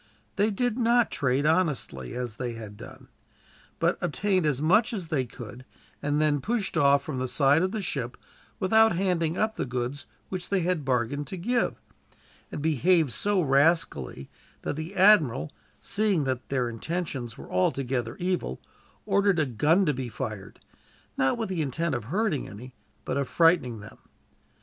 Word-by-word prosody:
They 205 +2 +2
did 245 +3 -1
not 240 0 +3
trade 135 0 0
honestly, 150 - 0
as 120 -3 -4
these 120 -2 -4
had 105 -2 -9
done; - - -12 0.7
but - - +1
obtained 185 0 +1
as 140 -3 0
much 220 - +3
as 185 -7 -4
they 135 -5 0
could, 120 +1 -10 0.4
and 145 +1 0
then 150 -2 +2
pushed 225 - -2
off 140 0 +4
from 140 -3 -4
the 130 - -1
side 140 +4 +3
of 185 +1 0
the 215 -1 -3
ship, 125 -8 -4 0.4
without 220 +1 +4
handing 175 -3 0
up 220 0 0
the - - -1
goods 125 +3 -4 0.2
which 185 -2 -5
they 195 -2 +1
had 175 -3 0
bargained 135 +2 -1
to 190 - -6
give; 240 +7 0 0.7
and 145 - -5
behaved 160 0 +3
so 200 - +1
rascally 140 - +1 0.4
that - - -2
the 160 +6 -6
admiral, 165 - +4 0.3
seeing 200 -6 +1
that 130 -2 -3
their 130 -3 0
intentions 125 -1 -4
were - - -11
altogether 120 +5 0
evil, 180 0 -2 0.5
ordered 200 -2 +2
a 155 - +3
gun 150 - +2
to 150 - +2
be 125 -1 -4
fired, 110 -6 -6 0.6
not 135 - +1
with 225 - -2
the 185 -4 -2
intent 155 +3 -1
of 120 -4 -3
hurting 185 - -1
any, 125 +5 -10 0.3
but - - -2
of 140 -2 -1
frightening 165 - +3
them. 110 - -13
150 Hz, 165 wpm, -27 LUFS, 125-185 Hz, 0.7 s, off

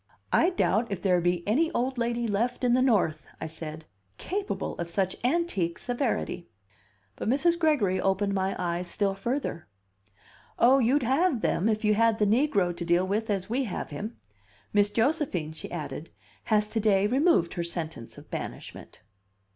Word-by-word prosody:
"I 345 - +5
doubt 230 - +1
if 195 - -2
there 180 -3 +3
be 175 +1 0
any 310 +10 +2
old 255 +1 -1
lady 235 0 0
left 235 +5 -1
in 245 -1 +3
the 255 - +4
North," 180 - +1
I - - -4
said, 160 0 -7 0.3
"capable 395 +2 -3
of 170 0 -3
such 190 +1 0
antique 245 - 0
severity." 245 -8 -2 0.7
But - - -2
Mrs. 335 +7 +2
Gregory 270 - +2
opened 195 +1 +1
my 190 0 0
eyes 175 0 -2
still 195 +3 0
further. 235 - -3 0.9
"Oh, 260 +3 +5
you'd 260 +3 +3
have 270 +1 +2
them 200 +6 +1
if 215 0 0
you 210 - +4
had 225 +1 +3
the 210 - +2
negro 205 - +2
to - - -4
deal 175 +2 +2
with 215 +4 -1
as 195 -3 -1
we 255 +4 0
have 190 - -5
him. 210 +11 -6 0.6
Miss 205 0 +4
Josephine," 225 - 0
she 160 - -8
added, 160 -1 -6 0.4
"has 210 -1 +2
to 225 - -1
day 200 -2 +3
removed 260 - +3
her 170 - -2
sentence 160 -8 -5
of - - -14
banishment." - - -7
210 Hz, 170 wpm, -27 LUFS, 180-250 Hz, 0.9 s, I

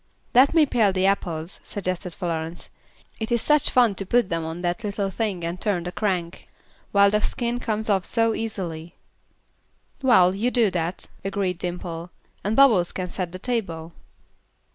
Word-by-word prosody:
"Let 265 +6 +5
me 320 -2 +6
pare 225 -7 +2
the 185 0 0
apples," 175 -3 -1
suggested 185 -2 -4
Florence; 165 -1 -4 0.5
"it 220 +1 -4
is 235 - +3
such 300 -1 +3
fun 240 -4 +4
to 195 - -1
put 240 -2 +2
them 165 -1 -1
on 165 +2 -5
that 175 +6 -1
little 200 -1 -2
thing 195 -4 -2
and 170 +2 -4
turn 190 -5 0
the 180 - -4
crank, 180 -4 -2 0.4
while 200 0 +5
the 210 0 +2
skin 240 +1 -1
comes 220 -2 -2
off 195 -3 +2
so 225 +2 +1
easily." 175 -8 -4 1.1
"Well, 190 -9 +5
you 215 +6 0
do 235 -5 +3
that," 175 0 -3 0.2
agreed 195 -2 -2
Dimple. 175 -1 -5 0.3
"And 210 +3 0
Bubbles 225 -11 +5
can 180 -1 -4
set 180 -2 -4
the 185 - -6
table." 185 -8 -3
195 Hz, 165 wpm, -24 LUFS, 175-225 Hz, 1.1 s, me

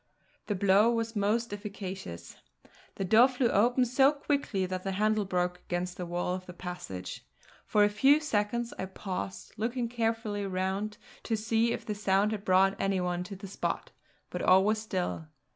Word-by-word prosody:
The 205 - 0
blow 200 +3 +4
was 230 -1 -2
most 215 +2 0
efficacious; 195 - -7 0.6
the 195 - -2
door 225 +6 +7
flew 255 -2 0
open 245 +5 +3
so 265 +3 +4
quickly 280 -9 -1
that 185 0 -3
the 195 0 -3
handle 215 +1 +1
broke 180 -1 -1
against 180 0 -3
the 180 - -4
wall 175 +1 -1
of 185 0 -6
the 180 - -8
passage. 95 - -6 0.4
For 210 - +4
a - - +6
few 270 +8 +4
seconds 235 -4 -1
I - - -1
paused, 190 0 -6
looking 235 +3 -1
carefully 225 -3 -1
round 190 +3 -2 0.2
to 225 - -1
see 225 +2 +1
if - - -4
the 210 - -2
sound 200 0 +2
had 210 -2 -4
brought 190 0 +4
any 195 -1 +1
one 180 0 -1
to 195 +1 -7
the 195 +2 -9
spot; 195 - -3 0.4
but - - -3
all 190 +1 +6
was 215 +1 +1
still. 185 -6 -3
205 Hz, 175 wpm, -30 LUFS, 185-225 Hz, 0.6 s, door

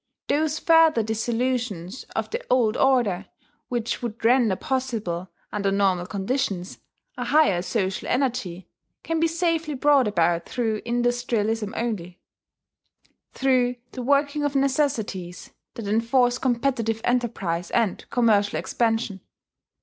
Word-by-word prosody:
Those 310 +1 +1
further 325 -8 +4
dissolutions 225 -2 -2
of - - -2
the - - -3
old 240 -3 +3
order 230 -8 +2 0.4
which 235 0 -2
would 235 -1 -5
render 235 -4 +4
possible, 220 -9 -3 0.2
under 200 -1 0
normal 190 -3 +1
conditions, 200 -3 -2 0.4
a - - -3
higher 295 - +3
social 190 +1 -2
energy, 220 -9 -1 0.4
can 330 0 -1
be 330 - +3
safely 330 -2 -1
brought 275 -2 +4
about 170 -3 +1
through 225 -4 -1
industrialism 235 -3 0
only, 185 -7 -3 1.1
through 255 -2 +2 0.2
the 255 - -6
working 285 +3 +1
of 290 -1 -1
necessities 245 -10 -1 0.2
that 225 -3 -6
enforce 245 +3 +2
competitive 235 -3 0
enterprise 215 -9 -1
and 225 -5 -1
commercial 220 -6 +2
expansion. 225 -4 -1
235 Hz, 115 wpm, -24 LUFS, 200-260 Hz, 1.1 s, further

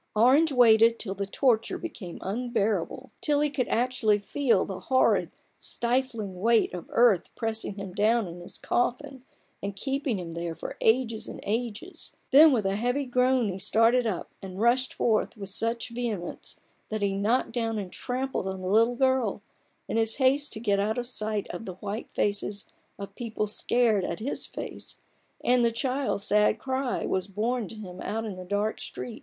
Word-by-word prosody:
Orange 260 +9 +5
watted 230 -2 +6
till 195 -4 -3
the 200 0 -4
torture 240 - +1
became 215 - -7
unbearable, 225 0 -1
till 295 -1 +2
he 295 -1 +1
could 260 -4 -1
actually 235 -3 +2
feel 225 0 +1
the 190 - -6
horrid, 260 -1 +2 0.3
stifling 235 -6 -1
weight 230 +1 +3
of 175 -2 -7
earth 230 -7 +4
pressing 225 -3 -3
him 195 -2 -7
down 220 +1 +2
in 175 +1 -9
his 175 - -9
coffin, 260 +2 -1 0.4
and 200 0 -4
keeping 270 +1 -1
him 175 -2 -6
there 170 0 -4
for - - -6
ages 225 -1 +2
and - - -8
ages: 230 - -4 0.2
then 300 +3 +9
with 225 -6 +1
a 195 +1 +1
heavy 245 +5 0
groan 250 -2 +2
he 190 0 -4
started 225 +4 +3
up, 190 -6 -3
and 190 0 -8
rushed 245 +3 +3
forth 220 0 0
with 195 -2 -6
such 230 +4 -1
vehemence, 230 -7 -4 0.3
that 215 -1 -2
he 200 -1 +1
knocked 215 +6 +1
down 225 -2 -1
and 195 -3 -5
trampled 255 -5 -2
on 190 0 -4
the 185 - -4
little 225 +5 +4
girl, 260 -6 +1 0.4
in - - -1
his 225 0 +2
haste 275 +2 +2
to - - -6
get 205 -3 +1
out 215 +3 0
of 245 - -2
sight 215 -4 -1
of 175 +6 -7
the 185 - -6
white 205 +4 -5
faces 205 0 -1 0.3
of 200 0 -8
people 220 -1 -3
scared 215 -1 +1
at 170 - -3
his 240 +6 -2
face, - - -7 0.4
and 245 0 +4
the 235 - +3
child's 255 -2 -1
sad 210 +2 +3
cry 260 +2 -2
was 185 0 -1
borne 220 +3 -1
to 225 - -9
him 185 -4 -9
out 225 +1 -3
in 205 -4 -5
the 185 - -8
dark 205 +4 -1
street. 235 - -7
225 Hz, 180 wpm, -27 LUFS, 200-250 Hz, 0.4 s, then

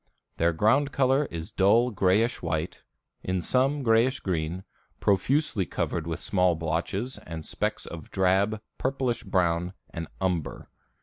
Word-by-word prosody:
Their 85 +1 +3
ground 115 - +2
color 135 +2 +2
is 85 +1 -6
dull 115 +6 +4
grayish 105 +4 +2
white, 80 0 -3 0.4
in 95 -1 -1
some 135 - +1
grayish 115 +3 +3
green, 85 0 -2 0.4
profusely 110 +2 +2
covered 85 -1 -2
with 85 0 -3
small 90 0 +2
blotches 85 +9 -2
and 80 -2 -8
specks - - -2
of 85 -2 -9
drab, 95 +3 +2 0.2
purplish 130 -3 -1
brown 90 0 0 0.2
and 85 -2 -5
umber. 90 -5 -2
95 Hz, 130 wpm, -27 LUFS, 85-120 Hz, 0.4 s, dull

